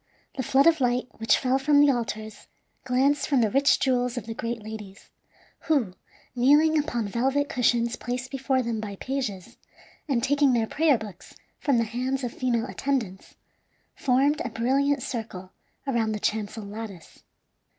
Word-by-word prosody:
The 270 Hz, -, -2 dB
flood 265 Hz, +2 st, +3 dB
of 325 Hz, -3 st, +4 dB
light 245 Hz, 0 st, +1 dB
which 225 Hz, -1 st, +3 dB
fell 260 Hz, 0 st, +1 dB
from 285 Hz, +1 st, +4 dB
the 290 Hz, -1 st, +6 dB
altars 220 Hz, -3 st, -5 dB, 0.4 s
glanced 270 Hz, +3 st, +2 dB
from 275 Hz, -4 st, +3 dB
the 220 Hz, -3 st, +1 dB
rich 275 Hz, +2 st, +3 dB
jewels 250 Hz, -2 st, 0 dB
of 230 Hz, -, -4 dB
the 225 Hz, -, -5 dB
great 230 Hz, -1 st, -4 dB
ladies, 210 Hz, -2 st, -10 dB, 0.6 s
who, 270 Hz, -, +1 dB, 0.4 s
kneeling 295 Hz, +6 st, +4 dB
upon 265 Hz, -8 st, 0 dB
velvet 270 Hz, +7 st, 0 dB
cushions 235 Hz, -1 st, +1 dB
placed 250 Hz, +1 st, -4 dB
before 265 Hz, -1 st, 0 dB
them 230 Hz, -2 st, -2 dB
by 210 Hz, -2 st, -5 dB
pages, 240 Hz, -6 st, -4 dB, 0.5 s
and 250 Hz, -5 st, 0 dB
taking 285 Hz, -1 st, +3 dB
their 230 Hz, -2 st, +2 dB
prayer 300 Hz, +2 st, +2 dB
books 210 Hz, -5 st, -11 dB, 0.2 s
from 275 Hz, -4 st, +1 dB
the 230 Hz, -, +3 dB
hands 255 Hz, +4 st, -2 dB
of 245 Hz, -, -3 dB
female 235 Hz, -3 st, 0 dB
attendants, 245 Hz, -9 st, -3 dB, 0.6 s
formed 275 Hz, +3 st, +2 dB
a 250 Hz, -, -3 dB
brilliant 265 Hz, +4 st, +1 dB
circle 195 Hz, -6 st, -6 dB, 0.3 s
around 230 Hz, -5 st, 0 dB
the 210 Hz, -, -3 dB
chancel 215 Hz, +1 st, -2 dB
lattice. 200 Hz, -4 st, -9 dB
245 Hz, 160 wpm, -26 LUFS, 220-275 Hz, 0.6 s, the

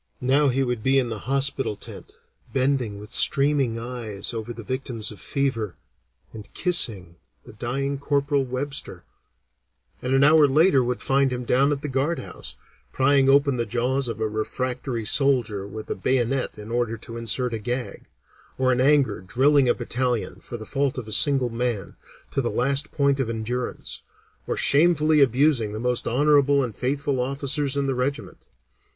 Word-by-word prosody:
Now 135 Hz, +3 st, +2 dB
he 135 Hz, +1 st, +1 dB
would 125 Hz, -3 st, -2 dB
be 135 Hz, +4 st, +2 dB
in 125 Hz, -3 st, +1 dB
the 110 Hz, -2 st, -5 dB
hospital 135 Hz, -4 st, 0 dB
tent -, -, -10 dB, 0.4 s
bending 130 Hz, -5 st, 0 dB
with 105 Hz, +1 st, -11 dB
streaming 140 Hz, -4 st, +4 dB
eyes 115 Hz, -3 st, -4 dB
over 115 Hz, +1 st, -5 dB
the 115 Hz, -1 st, -9 dB
victims 125 Hz, -2 st, -4 dB
of 105 Hz, -, -11 dB
fever, 115 Hz, -, -2 dB, 0.6 s
and 105 Hz, -2 st, -11 dB
kissing 105 Hz, -, +2 dB, 0.3 s
the -, -, -13 dB
dying 135 Hz, +5 st, -3 dB
Corporal 140 Hz, 0 st, 0 dB
Webster, 135 Hz, +2 st, -4 dB, 1.0 s
and 130 Hz, +1 st, 0 dB
an 135 Hz, -, +4 dB
hour 150 Hz, 0 st, +6 dB
later 140 Hz, -1 st, +3 dB
would 125 Hz, 0 st, -3 dB
find 135 Hz, 0 st, +2 dB
him 125 Hz, 0 st, -4 dB
down 135 Hz, +4 st, +2 dB
at 145 Hz, -1 st, -3 dB
the -, -, -2 dB
guard 140 Hz, +5 st, -1 dB
house, -, -, -5 dB, 0.4 s
prying 135 Hz, 0 st, +3 dB
open 140 Hz, -1 st, +3 dB
the 120 Hz, -, -1 dB
jaws 125 Hz, +4 st, -1 dB
of 115 Hz, -2 st, -5 dB
a 110 Hz, -, 0 dB
refractory 120 Hz, +2 st, -4 dB
soldier 115 Hz, -6 st, +1 dB
with 110 Hz, +2 st, -8 dB
a -, -, -1 dB
bayonet 130 Hz, +4 st, -1 dB
in 105 Hz, +1 st, -9 dB
order 120 Hz, -1 st, -1 dB
to 115 Hz, +1 st, -9 dB
insert 115 Hz, +2 st, +1 dB
a 115 Hz, -, -3 dB
gag; 120 Hz, +3 st, -4 dB, 0.5 s
or 130 Hz, -1 st, +2 dB
in 125 Hz, 0 st, +1 dB
anger 135 Hz, -8 st, +2 dB
drilling 130 Hz, +7 st, +2 dB
a -, -, +3 dB
battalion, 120 Hz, -1 st, -2 dB
for 120 Hz, -, -8 dB
the 110 Hz, -, -8 dB
fault 140 Hz, 0 st, -1 dB
of 120 Hz, -4 st, -6 dB
a -, -, -8 dB
single 135 Hz, 0 st, +4 dB
man, 115 Hz, -4 st, -3 dB, 0.4 s
to 135 Hz, -, 0 dB
the 120 Hz, -, -2 dB
last 140 Hz, +4 st, 0 dB
point 140 Hz, -1 st, +1 dB
of 130 Hz, -4 st, -1 dB
endurance; 115 Hz, +2 st, -4 dB, 0.5 s
or -, -, -2 dB
shamefully 155 Hz, 0 st, +4 dB
abusing 130 Hz, -4 st, +2 dB
the 110 Hz, -, -5 dB
most 125 Hz, +1 st, 0 dB
honorable 140 Hz, +2 st, +3 dB
and 115 Hz, -5 st, -5 dB
faithful 140 Hz, +1 st, -2 dB
officers 140 Hz, +2 st, 0 dB
in 140 Hz, -, 0 dB
the 135 Hz, -, 0 dB
regiment. 140 Hz, +3 st, -4 dB
130 Hz, 170 wpm, -23 LUFS, 115-140 Hz, 1.0 s, hour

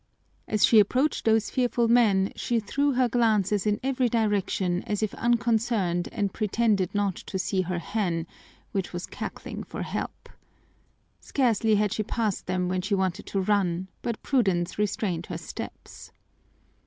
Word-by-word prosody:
As 215 Hz, -2 st, +4 dB
she 225 Hz, -, +6 dB
approached 255 Hz, +8 st, +2 dB
those 225 Hz, -1 st, +3 dB
fearful 245 Hz, -2 st, +1 dB
men 215 Hz, -5 st, +4 dB
she 235 Hz, -1 st, 0 dB
threw 280 Hz, +6 st, 0 dB
her 255 Hz, 0 st, +3 dB
glances 215 Hz, -4 st, +2 dB
in 210 Hz, 0 st, +1 dB
every 260 Hz, -2 st, +1 dB
direction 200 Hz, -5 st, 0 dB
as 210 Hz, 0 st, -1 dB
if 215 Hz, -, -1 dB
unconcerned 230 Hz, -6 st, +1 dB
and 200 Hz, -2 st, -1 dB
pretended 210 Hz, -3 st, +1 dB
not 200 Hz, -3 st, +1 dB
to 190 Hz, -, -5 dB
see 190 Hz, 0 st, 0 dB
her 180 Hz, -1 st, -2 dB
hen, 170 Hz, -2 st, -1 dB, 0.5 s
which 195 Hz, -2 st, -3 dB
was 175 Hz, 0 st, -4 dB
cackling -, -, -6 dB
for -, -, -6 dB
help. -, -, -5 dB, 0.9 s
Scarcely 225 Hz, -5 st, +2 dB
had 210 Hz, -1 st, +1 dB
she -, -, -1 dB
passed 215 Hz, -2 st, -2 dB
them 180 Hz, 0 st, 0 dB
when 185 Hz, 0 st, -1 dB
she 195 Hz, +2 st, 0 dB
wanted 190 Hz, -2 st, -1 dB
to 195 Hz, -, -1 dB
run, 190 Hz, -2 st, 0 dB
but 235 Hz, -2 st, -4 dB
prudence 190 Hz, -10 st, +1 dB
restrained 190 Hz, -4 st, -1 dB
her 175 Hz, -, -4 dB
steps. 165 Hz, -, -9 dB
210 Hz, 155 wpm, -26 LUFS, 185-230 Hz, 0.9 s, she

